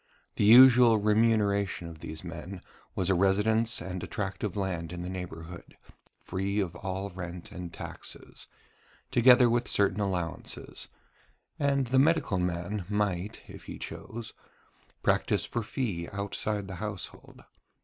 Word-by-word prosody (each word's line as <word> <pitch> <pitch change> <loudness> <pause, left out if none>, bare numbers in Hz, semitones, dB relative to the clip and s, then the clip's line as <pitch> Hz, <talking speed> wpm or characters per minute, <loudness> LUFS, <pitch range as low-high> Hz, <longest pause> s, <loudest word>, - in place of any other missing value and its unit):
The - - +2
usual 120 +1 +8
remuneration 105 -4 +2
of 80 -1 -10
these 80 +1 -6
men 85 +2 -7 0.3
was 95 0 +1
a - - +5
residence 105 +5 +2
and 90 -1 -5
a - - -5
tract 100 -3 -4
of 105 -2 -2
land 85 -4 -2
in 90 0 -5
the 90 - -5
neighbourhood, 85 -2 -8 0.4
free 95 +3 -2
of 90 -4 -2
all 95 +1 -4
rent 90 -1 -7
and 90 -2 -7
taxes, - - -8 0.6
together 125 +1 +7
with 120 +1 +1
certain 100 0 +2
allowances: 90 -5 -3 0.7
and 140 -2 +2
the 130 +2 +3
medical 145 - +3
man 90 +3 -2
might, 105 -1 -1
if - - -12
he - - -7
chose, 115 0 -7 0.7
practise - - +2
for 120 - -2
fee 105 -7 -3
outside 100 0 -2
the 95 -2 -7
household. 105 -4 -7
100 Hz, 140 wpm, -29 LUFS, 90-110 Hz, 0.7 s, usual